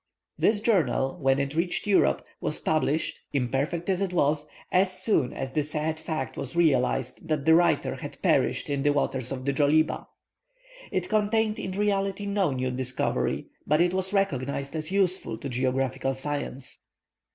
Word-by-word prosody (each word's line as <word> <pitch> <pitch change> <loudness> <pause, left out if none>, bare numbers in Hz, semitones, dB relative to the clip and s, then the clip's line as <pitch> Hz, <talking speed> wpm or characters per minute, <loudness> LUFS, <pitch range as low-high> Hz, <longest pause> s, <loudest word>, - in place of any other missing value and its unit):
This 210 -1 +2
journal, 155 - +2
when 135 -1 +3
it 140 0 -1
reached 170 +2 0
Europe, 205 -2 +3
was 150 - -1
published, 155 0 0
imperfect 140 +6 -1
as 190 -1 +1
it 190 -2 -1
was, 150 -2 +1 0.2
as 185 +1 +3
soon 185 - +1
as 135 0 -5
the 150 +2 0
sad 155 +1 -2
fact 160 -1 -4
was 140 +2 -5
realized 135 -3 +1
that 150 -3 -1
the 160 - +6
writer 170 0 +3
had - - -8
perished - - +2
in 140 -1 -1
the 145 +1 +3
waters 130 -3 -1
of 130 -1 -4
the 140 - +1
Djoliba. 150 +3 +2 0.8
It 180 -1 -1
contained 215 +1 +1
in 185 - -4
reality 200 0 0
no 200 -3 +1
new 130 -1 -1
discovery, 125 0 -1 0.2
but 150 +1 +3
it 175 +1 +3
was 190 0 -1
recognized 140 -7 -1
as 155 +2 -3
useful 190 - 0
to 140 - -6
geographical 130 +1 -1
science. 140 -1 -5
155 Hz, 165 wpm, -27 LUFS, 135-185 Hz, 0.8 s, the